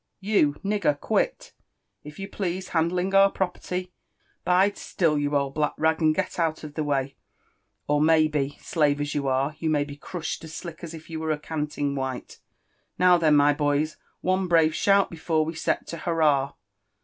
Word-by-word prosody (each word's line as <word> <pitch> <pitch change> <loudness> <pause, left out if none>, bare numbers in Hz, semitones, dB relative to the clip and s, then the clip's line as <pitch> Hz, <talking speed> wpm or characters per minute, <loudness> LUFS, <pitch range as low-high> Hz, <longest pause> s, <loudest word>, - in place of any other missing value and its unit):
you 195 -8 +2
nigger— 200 -8 +1
quit, - - -1 0.5
if 150 0 -11
you 195 - -5
please, 185 -2 -4
handling 180 +3 0
our 195 0 +6
pro 190 -2 -1
perty; 180 0 -6 0.5
bide 190 +3 +3
still, 165 -4 0
you 145 0 0
old 140 -1 -2
black 150 0 0
rag, 160 +1 +1
and 155 -1 +3
get - - -2
out 160 -2 0
of 150 -1 -8
the 155 - -2
way— 140 -2 -1 0.7
or 145 0 +2
may 155 0 +5
be, 145 -2 -2
slave 145 -3 +1
as 145 +1 -2
you 140 -2 -1
are, 135 +3 0
you 160 - -1
may 150 -2 +2
be 145 0 -8
crushed 165 +3 -5
as 160 -1 -9
sUck 170 -3 -8
as 165 -1 -6
if 160 0 -12
you 160 -1 -5
were 160 0 -3
a 155 - +1
canting 150 -2 -3
white. 130 -2 -5 0.3
— - - -44
^Now 180 -1 +6
then, 155 -2 +4
my 145 0 +5
boys 145 +1 0
I - - -28 0.2
One 185 0 +1
braye 165 -2 +4
shout 200 +4 +3
before 160 -1 0
we 160 - -4
set 165 - -1
tcH^hurrah 155 -4 0
155 Hz, 195 wpm, -25 LUFS, 145-175 Hz, 0.7 s, our